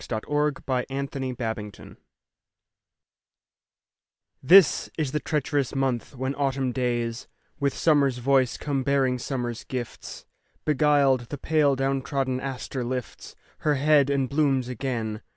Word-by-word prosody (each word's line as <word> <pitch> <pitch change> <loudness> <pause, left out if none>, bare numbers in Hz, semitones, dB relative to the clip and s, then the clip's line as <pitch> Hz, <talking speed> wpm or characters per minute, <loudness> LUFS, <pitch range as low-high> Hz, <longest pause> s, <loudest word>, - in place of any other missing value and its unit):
Helen 110 -2 -2
Hunt 150 -1 0
Jackson 135 0 -2
November 110 -3 -6 2.4
THIS 180 +5 +6
is 150 -5 -1
the 150 - 0
treacherous 145 -3 -1
month 135 0 -1
when 130 +2 -2
autumn 135 -2 -1
days 120 -2 -2 0.3
With 140 -1 0
summer's 140 -5 +3
voice 130 0 +2
come 140 -2 -2
bearing 130 -2 +1
summer's 120 -2 -4
gifts. 125 -3 -7 0.4
Beguiled, 140 -4 +3
the 145 - -5
pale 150 -1 +2
down 135 0 0
trodden 130 -2 -1
aster 130 -1 -4
lifts 125 0 -5 0.2
Her 150 -1 +1
head 145 0 +4
and 140 -2 +1
blooms 135 -3 +1
again. 115 -4 -3
135 Hz, 120 wpm, -25 LUFS, 125-140 Hz, 2.4 s, THIS